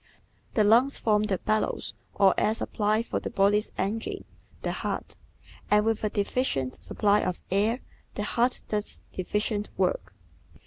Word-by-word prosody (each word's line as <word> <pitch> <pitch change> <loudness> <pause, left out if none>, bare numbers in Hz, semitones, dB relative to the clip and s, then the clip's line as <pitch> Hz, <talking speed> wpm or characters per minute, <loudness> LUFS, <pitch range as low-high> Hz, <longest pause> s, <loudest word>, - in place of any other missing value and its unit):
The 215 - +4
lungs 240 +6 +5
form 210 -1 +2
the 195 -3 0
bellows 215 +4 -1 0.2
or 195 -2 +5
air 215 - +2
supply 215 0 0
for - - -2
the - - -5
body's 205 +2 +2
engine, 215 +4 -2 0.4
the - - 0
heart, - - -4 0.5
and 210 0 +4
with 225 -1 0
a 215 - +2
deficient 200 - -1
supply 205 -1 +2
of 180 -3 -2
air 215 +6 +2 0.3
the 205 - -2
heart 240 +4 +1
does 210 -1 -1
deficient 210 +3 -2
work. - - 0
210 Hz, 145 wpm, -27 LUFS, 205-225 Hz, 0.5 s, lungs